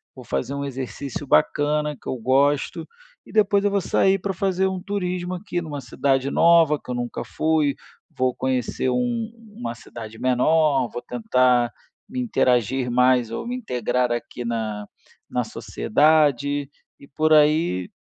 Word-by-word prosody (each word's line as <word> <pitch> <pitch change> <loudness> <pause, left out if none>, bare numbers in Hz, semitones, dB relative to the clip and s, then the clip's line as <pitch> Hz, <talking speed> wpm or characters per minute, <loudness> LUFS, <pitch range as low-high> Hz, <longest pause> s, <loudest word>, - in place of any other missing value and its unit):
Vou - - -10
fazer 70 - -2
um 140 - -3
exercício 135 +1 -5
bacana 150 +1 +2
que - - -13
eu - - -1
gosto. 135 +4 +1 0.4
E - - -14
depois 205 -2 +3
eu 205 - +2
vou 200 0 +1
sair 195 +2 +2
pra 195 +1 -2
fazer 190 +1 0
um 190 -1 -3
turismo 180 -2 -3
aqui 180 -1 -4
numa 150 -4 -6
cidade 135 0 0
nova, 165 -3 +5
que - - -7
eu - - -2
nunca 120 0 -4
fui. 155 -3 +1 0.4
Vou 130 -1 0
conhecer 130 -1 -1
um 235 - -1 0.2
uma 120 - -4
cidade 110 -1 -10
menor, 135 +2 +2
vou 120 - -5
tentar 125 0 +2 0.4
me 255 +3 -4
interagir 125 - +1
mais 125 -1 +3
ou 115 - -5
me 245 - -3
integrar 125 - -1
aqui 120 +1 -4
na 110 -3 -3 0.4
na - - -1
sociedade", 145 0 +1 0.3
e 140 - -15
por 155 +3 +1
aí, 150 - +3
140 Hz, 155 wpm, -23 LUFS, 125-170 Hz, 0.4 s, nova